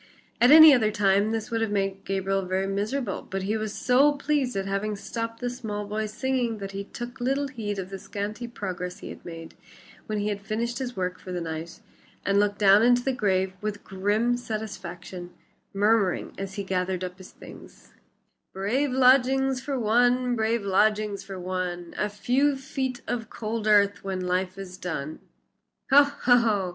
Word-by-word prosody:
At 245 - +7
any 315 0 +10
other 225 -5 +3
time 200 0 +2
this 225 +1 -3
would 230 -1 0
have 225 - 0
made 195 -1 -2
Gabriel 195 0 0
very 185 +1 -1
miserable, 205 +3 -2
but 195 0 -5
he 205 +3 -1
was 215 -1 -2
so 270 +4 +4
pleased 280 -4 -1
at 195 - -1
having 200 +2 -2
stopped 230 +2 -5
the 245 - -1
small 210 -4 -5
boy's 215 +1 -3
singing 245 -1 -1
that 195 -1 -6
he 200 0 -5
took 240 +4 -8
little 275 +3 0
heed 215 -5 -4
of 190 0 -5
the 195 - -6
scanty 205 +4 -5
progress 180 -5 -5
he - - -9
had - - -10
made 165 -1 -9 0.5
when 215 - -2
he 205 0 -1
had 200 -1 -3
finished 230 +4 -3 0.2
work 185 0 -2
for 185 - -9
the 180 - -2
night, 165 0 -6 0.4
and 200 +1 +3
looked 205 0 +1
down 200 0 +6
into 245 +1 +4
the 270 - 0
grave 190 -5 0
with 210 -1 -4
grim 210 +5 0
satisfaction, 190 -6 -7 0.4
murmuring 205 -2 +1
as 195 0 -6
he 200 - -3
gathered 185 -1 -1
up 180 0 -6
his 185 - -11
things: - - -14 0.6
"Brave 245 +9 0
lodgings 265 0 +4
for 275 -1 -3
one, 245 +2 +3
brave 225 -1 0
lodgings 210 0 +1
for 195 -1 -8
one, 180 -1 -4
A 210 - -1
few 260 +7 +1
feet 265 -2 -4
of 230 -2 -3
cold 220 0 -4
earth 205 -1 +4
when 190 -1 -3
life 185 +1 -1
is 185 -2 -8
done." 155 -3 -4 0.7
"Ho! 285 +2 +9
ho!" 235 -8 +2
210 Hz, 175 wpm, -26 LUFS, 195-245 Hz, 0.7 s, any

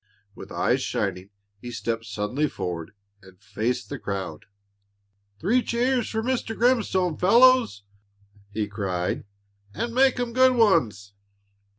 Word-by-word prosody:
With 100 - -11
eyes 130 +2 +1
shining, 100 -7 -3 0.3
he 120 - -8
stepped 115 0 -3
suddenly 105 +8 -2
forward 85 -2 -5 0.3
and 95 -1 -18
faced 120 +4 -3
the 145 - -6
crowd. 95 -3 -5 0.9
"Three 220 - +2
cheers 245 0 0
for 220 0 -2
Mr. 240 -3 -2
Grimstone, 200 -9 +1
fellows!" 235 - +4 0.7
he 105 0 -2
cried; 95 -4 -3 0.5
"and 235 0 -3
make 260 0 +3
'em 240 -1 -2
good 255 0 +5
ones!" 120 - +2
125 Hz, 120 wpm, -25 LUFS, -, 0.9 s, good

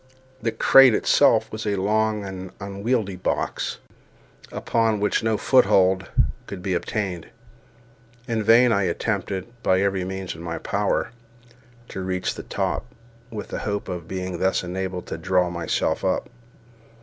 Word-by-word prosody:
The 115 - 0
crate 135 -2 +7
itself - - +3
was 110 0 -5
a 100 - +1
long 105 +2 0
and 95 -1 -7
unwieldy 100 +1 -2
box, 90 - -2 0.7
upon 115 -2 0
which 105 0 +1
no 110 -1 +1
foothold 95 -7 +3 0.4
could 95 -3 -7
be 95 - -1
obtained. 90 -1 -3 1.0
In 115 -2 0
vain 115 +3 +6
I 100 -2 +2
attempted, 95 +1 -2 0.2
by 95 -5 +3
every 100 -2 0
means 95 0 -4
in 80 - -11
my 85 -1 -4
power, - - -1 0.8
to 95 - -5
reach 95 -1 -2
the - - -7
top, - - -2 0.4
with 105 -4 -7
the - - -4
hope 100 -1 -3
of 90 -3 -5
being 95 -2 -4
thus 95 0 +1
enabled 90 0 -4
to - - -6
draw 90 0 +1
myself 85 -1 -1
up. - - 0
95 Hz, 145 wpm, -24 LUFS, 90-110 Hz, 1.0 s, crate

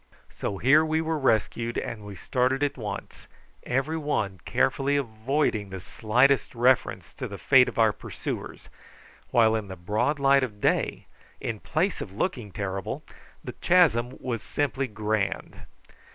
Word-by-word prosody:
So 100 - -4
here 145 +9 +5
we 160 0 +1
were 160 -1 -1
rescued, 115 -2 +1
and 105 -2 -4
we 105 -1 -8
started 130 +5 0
at 145 - 0
once, 105 -5 -7 0.3
every 135 +6 -1
one 110 - -1
carefully 140 +1 +1
avoiding 115 -3 -1
the 95 0 -6
slightest 125 +9 +2
reference 125 +2 +2
to - - -4
the - - -7
fate - - +5
of - - -11
our - - +4
pursuers, - - -6 0.6
while 110 -2 +4
in 110 -2 -3
the 95 - -7
broad 105 - 0
light 140 0 +4
of 110 -5 -4
day, - - 0 0.3
in 115 -2 -4
place 180 - -1
of 95 - -6
looking 115 - -2
terrible, 95 -2 -4 0.4
the - - -6
chasm 130 -9 +3
was 120 -4 -3
simply 135 -2 -1
grand. 105 -2 -3
120 Hz, 150 wpm, -26 LUFS, 105-140 Hz, 0.6 s, here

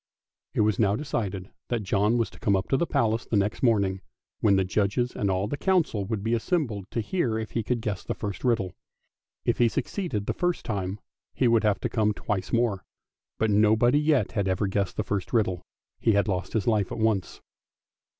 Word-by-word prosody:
It - - +3
was 105 -2 +2
now 100 -2 +3
decided 100 -9 -3 0.2
that 120 -3 -1
John 105 +4 +2
was 115 - 0
to - - -15
come 100 - +2
up 95 0 -1
to 135 - +3
the 170 - 0
Palace 115 -2 0
the - - -1
next 100 +2 0
morning, 100 -6 +2 0.4
when 100 -2 +4
the 95 - +3
judges 105 +6 0
and 100 - 0
all 95 +1 0
the 145 - -3
council 165 - +1
would 105 -1 -3
be 115 +1 0
assembled 115 - -1
to 115 - -2
hear 120 - -1
if 110 -1 -4
he 115 - -1
could 120 +2 -1
guess 105 -5 -3
the - - -3
first 100 -3 -5
riddle. 115 -8 +1 0.7
If - - +1
he 120 -1 +5
suc - - -1
ceeded 150 - -3
the - - -1
first 175 -1 -1
time, 100 -2 -3 0.4
he 130 - +2
would 115 -1 +4
have 105 -2 +2
to - - 0
come 105 -2 +1
twice 95 -3 -3
more, 115 -5 +1 0.5
but 110 -1 +1
nobody 110 +6 +4
yet 150 -2 +2
had 100 -2 -1
ever 95 +2 +1
guessed 100 0 -1
the 105 - 0
first 100 0 -3
riddle 100 -6 +1 0.2
— - - -61
he 110 - +3
had 100 +1 +2
lost 90 -3 -2
his 110 -4 0
life 105 -4 +1
at - - -4
once. 110 -6 0
105 Hz, 220 wpm, -26 LUFS, 100-120 Hz, 0.7 s, he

